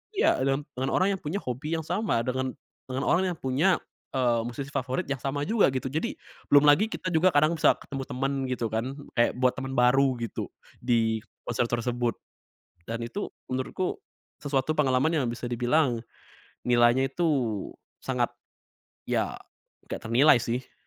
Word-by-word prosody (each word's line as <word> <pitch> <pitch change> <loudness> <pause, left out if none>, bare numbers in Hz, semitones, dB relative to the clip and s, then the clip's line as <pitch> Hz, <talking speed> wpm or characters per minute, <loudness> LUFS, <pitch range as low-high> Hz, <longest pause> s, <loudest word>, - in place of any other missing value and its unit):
iya 395 - +3
deng 135 +2 +1
dengan 130 +2 -2
orang 195 +2 +3
yang 190 - -4
punya 150 +5 -4
hobi 135 +6 -3
yang 160 - -4
sama, 200 - 0
dengan 130 0 -1 0.4
dengan 130 +1 -2
orang 185 +3 +2
yang - - -22
punya, 145 +9 +2 0.4
e - - +1 0.3
musisi 135 +3 -6
favorit 130 +4 -1
yang 135 - -1
sama 140 +3 -2
juga 220 +6 +3
gitu. 130 0 -2
Jadi, 155 +2 -2 0.3
belum 145 0 +6
lagi 150 +9 +5
kita 185 -4 -4
juga 165 +3 +4
kadang 155 +2 +3
bisa - - +5
ketemu 135 -2 -6
temen 135 +2 -1 0.2
gitu 120 -3 -2
kan, 120 +5 -2 0.2
kayak 120 - +3
buat 125 0 +3
temen 135 0 -4
baru 130 +1 +4
gitu 115 - -4 0.3
di 115 -2 +1 0.2
konser 120 0 0
tersebut 120 0 -1 0.7
dan 115 +3 -4
itu 120 +13 -4 0.2
menurutku 130 +8 -2 0.5
sesuatu 140 +2 0
pengalaman 135 0 +3
yang 145 -5 +1
bisa 120 +1 -5
dibilang 120 0 +1 0.6
nilainya 120 +2 +4
itu, 170 +6 -2 0.8
sangat - - +1 0.8
ya, - - -1 0.5
gak - - -6
ternilai 120 +2 +5
sih. 125 +2 -3
130 Hz, 160 wpm, -27 LUFS, 120-150 Hz, 0.8 s, belum